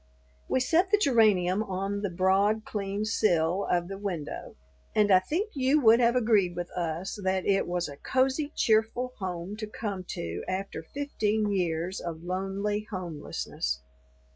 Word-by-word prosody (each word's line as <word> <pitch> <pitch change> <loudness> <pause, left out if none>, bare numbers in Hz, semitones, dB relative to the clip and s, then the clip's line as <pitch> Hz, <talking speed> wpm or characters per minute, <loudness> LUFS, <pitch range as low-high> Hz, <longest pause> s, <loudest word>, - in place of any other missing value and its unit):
We - - +2
set 335 +9 +2
the 420 - +5
geranium 215 - +3
on 195 0 -2
the 200 - -1
broad 195 +4 +2
clean 200 0 -3
sill 185 -4 +2
of 175 -1 +1
the 195 +1 -6
window, 180 -7 -5 0.4
and 210 -1 +4
I 185 - +8
think 350 - -2
you 270 +2 +3
would 230 -3 +6
have 240 0 +4
agreed 215 -7 +3
with 175 0 -4
us 175 +3 -3
that 190 0 0
it 195 -1 +2
was 175 0 -1
a 140 - -9
cozy, 265 - 0
cheerful 225 +3 +2
home 185 0 -4
to 215 0 -5
come 205 -3 -4
to 85 - -5
after 190 0 -3
fifteen 215 - -1
years 175 -1 -1
of 165 -1 -6
lonely 195 +3 -2
homelessness. 155 - -4
195 Hz, 155 wpm, -28 LUFS, 180-220 Hz, 0.4 s, I